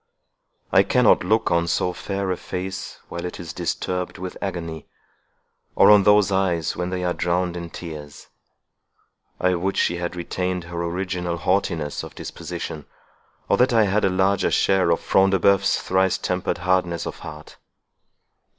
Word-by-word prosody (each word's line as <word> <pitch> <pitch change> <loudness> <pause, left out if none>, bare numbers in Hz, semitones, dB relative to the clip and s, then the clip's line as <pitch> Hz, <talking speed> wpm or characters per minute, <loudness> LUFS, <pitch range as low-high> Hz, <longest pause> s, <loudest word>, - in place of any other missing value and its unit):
I - - +6
cannot - - +4
look - - +1
on 85 0 +2
so 90 +1 0
fair 100 0 -3
a - - 0
face 95 +1 -6
while 85 - -5
it 90 - -6
is 80 -3 -7
disturbed 90 +1 -3
with 90 0 -6
agony, 85 -5 -5 0.9
or - - +7
on 105 -1 +8
those 105 0 +4
eyes 90 -4 0
when 90 0 -3
they 90 0 -3
are 90 -1 0
drowned 85 0 -1
in 85 -1 -6
tears. 75 -4 -9 1.1
I 90 0 +2
would 95 +2 -1
she 85 - +1
had 85 0 -4
retained 90 +1 -3
her 85 0 -5
original 90 0 -2
haughtiness 85 -4 -1
of - - -10
disposition, 75 -2 -6 0.6
or - - +3
that 125 0 +3
I 115 -1 +5
had 105 +1 +1
a 95 - +4
larger 95 +1 +2
share 95 -3 +2
of 85 - +2
Front 95 0 +3
de 95 - +3
Bœuf's 100 +2 +3
thrice 95 0 +1
tempered 90 -1 -2
hardness 90 -2 0
of - - -6
heart!" 75 0 -10
90 Hz, 160 wpm, -23 LUFS, 85-95 Hz, 1.1 s, on